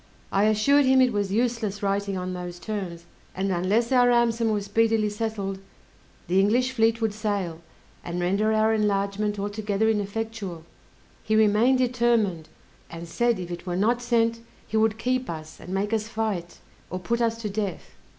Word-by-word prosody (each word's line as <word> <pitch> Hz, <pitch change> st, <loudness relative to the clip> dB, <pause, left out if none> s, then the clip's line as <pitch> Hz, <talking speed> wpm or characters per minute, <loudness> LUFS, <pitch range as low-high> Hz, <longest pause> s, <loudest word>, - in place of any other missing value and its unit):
I 195 Hz, +2 st, +3 dB
assured 240 Hz, +7 st, +4 dB
him 260 Hz, 0 st, +5 dB
it 255 Hz, -2 st, +4 dB
was 205 Hz, -2 st, -1 dB
useless 220 Hz, -2 st, -1 dB
writing 200 Hz, 0 st, 0 dB
on 185 Hz, 0 st, -3 dB
those 180 Hz, -1 st, -6 dB
terms, 180 Hz, -4 st, -5 dB, 0.3 s
and 195 Hz, +1 st, -1 dB
unless 200 Hz, +7 st, +1 dB
our 250 Hz, -1 st, +5 dB
ransom 235 Hz, -1 st, +2 dB
was 205 Hz, -2 st, -1 dB
speedily 220 Hz, +1 st, +2 dB
settled, 205 Hz, -3 st, -3 dB, 0.7 s
the 185 Hz, +3 st, +3 dB
English 240 Hz, +6 st, +2 dB
fleet 225 Hz, -2 st, +2 dB
would 220 Hz, -2 st, 0 dB
sail, 200 Hz, -6 st, -3 dB, 0.4 s
and 175 Hz, +1 st, -4 dB
render 200 Hz, +5 st, +1 dB
our 220 Hz, 0 st, +3 dB
enlargement 205 Hz, 0 st, 0 dB
altogether 205 Hz, +1 st, -1 dB
ineffectual. 205 Hz, -4 st, -4 dB, 0.6 s
He 215 Hz, -, +1 dB
remained 220 Hz, +4 st, +4 dB
determined, 235 Hz, -9 st, +1 dB, 0.4 s
and 170 Hz, 0 st, -8 dB
said 235 Hz, +7 st, +1 dB
if 175 Hz, -1 st, -6 dB
it 175 Hz, +1 st, -7 dB
were 175 Hz, -, -1 dB
not 230 Hz, +6 st, +1 dB
sent, 230 Hz, -1 st, +1 dB, 0.3 s
he -, -, -6 dB
would 220 Hz, 0 st, +2 dB
keep 255 Hz, +2 st, -1 dB
us, 155 Hz, -2 st, -7 dB
and 180 Hz, -, -9 dB
make 200 Hz, +3 st, -1 dB
us 215 Hz, -1 st, 0 dB
fight, 215 Hz, -7 st, -3 dB, 0.3 s
or 185 Hz, -, -4 dB
put 230 Hz, +6 st, -2 dB
us 230 Hz, -1 st, 0 dB
to -, -, -1 dB
death. 200 Hz, -3 st, -4 dB
210 Hz, 170 wpm, -25 LUFS, 195-230 Hz, 0.7 s, him